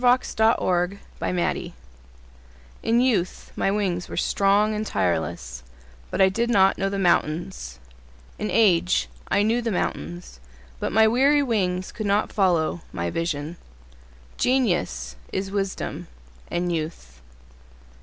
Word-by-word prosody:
Alexander 240 -2 +3
Throckmorton 180 -1 -2 1.1
In 235 +2 +2
youth 215 -9 0
my - - +1
wings 190 -4 -1
were - - -6
strong 205 +2 +2
and 215 0 -2
tireless, 80 - -2 0.5
But - - -4
I 190 - +7
did 230 +5 0
not 195 -4 +4
know 195 - +1
the 200 - -3
mountains. 170 - 0 0.6
In 210 - -2
age 170 - +3 0.2
I 200 - +2
knew 230 +3 +2
the 235 - -2
mountains 175 - -4 0.4
But - - -2
my 220 +1 +5
weary 275 +5 +4
wings 185 -7 -1
could 215 -2 -4
not 200 +1 +1
follow 175 -4 +1
my 85 0 -3
vision— 165 0 -3 0.8
Genius 90 - 0
is 195 0 -3
wisdom 195 -1 -3 0.4
and 175 0 -1
youth. 155 - -5
190 Hz, 125 wpm, -24 LUFS, 165-215 Hz, 1.1 s, I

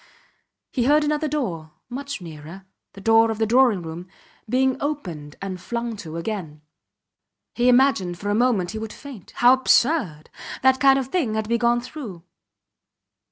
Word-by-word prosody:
He 245 -3 0
heard 300 +3 +4
another 300 +1 0
door, 180 - -3
much 280 -1 -6
nearer 165 +3 -10 0.3
the 195 - -12
door 225 +2 +4
of 220 - -2
the 220 - +1
drawing 230 -5 +3
room 165 +2 -7 0.4
being 260 +2 +2
opened 175 - -5
and 185 -2 -5
flung 235 +1 -4
to 165 -4 -7
again. 165 -5 -5 0.9
He 245 +1 +2
imagined 245 -9 +3
for 205 +3 -3
a - - +1
moment 215 -6 +1
he 220 - -5
would 220 -1 -6
faint. 265 - -11
How 245 +1 +6
absurd! 255 - +1 0.3
That 265 0 +4
kind 270 0 +5
of 265 -1 -3
thing 265 -10 -1
had 220 0 -1
to - - -11
be 235 0 +1
gone 240 +1 +2
through. 240 - -9
225 Hz, 165 wpm, -23 LUFS, 180-265 Hz, 0.9 s, How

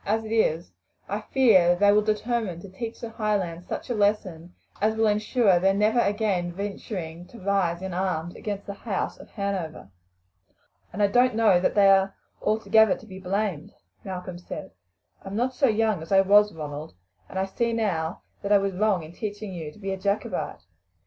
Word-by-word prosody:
As 220 +2 0
it 215 - -7
is, 175 -7 +1 0.4
I - - -3
fear 225 -10 +4
that 175 0 +3
they 205 0 +6
will 210 +1 +5
determine 215 -3 -1
to 195 - -10
teach 225 +4 -6
the 235 - -5
Highlands 195 -6 -2
such - - -5
a 245 - -1
lesson 195 -5 -1 0.3
as 220 +1 +2
will 220 0 +2
ensure 210 -2 +3
their 195 +2 +3
never 215 +4 +3
again 200 -5 0
venturing 180 -3 -6
to 235 - -13
rise 190 -3 0
in 190 -1 -4
arms 175 -2 -2
against 200 -2 -5
the 200 - -5
house 200 -1 -3
of - - -13
Hanover." 190 - -4 1.0
"And 205 +3 -1
I - - +6
don't 245 +3 +3
know 220 -5 +5
that 180 - 0
they 200 -1 +6
are 195 0 +4 0.3
altogether 220 -1 +4
to - - -14
be 190 -3 -10
blamed," 190 -4 -2 0.3
Malcolm 185 -2 -6
said. 175 - -8 0.5
"I - - -10
am 195 - -5
not 250 +4 0
so 270 +2 +3
young 215 -5 +1
as 160 - -10
I 195 0 +6
was, 205 +2 +5
Ronald, 150 - -7 0.3
and - - -7
I 190 - +1
see 230 +4 -1
now 180 -8 -1 0.2
that 200 - -3
I 205 - +8
was 195 -1 -1
wrong 195 -2 +1
in 155 - -10
teaching 205 0 -5
you 160 -4 -6
to - - -19
be 195 -2 -4
a - - -4
Jacobite. 200 - -2
200 Hz, 195 wpm, -26 LUFS, 180-215 Hz, 1.0 s, I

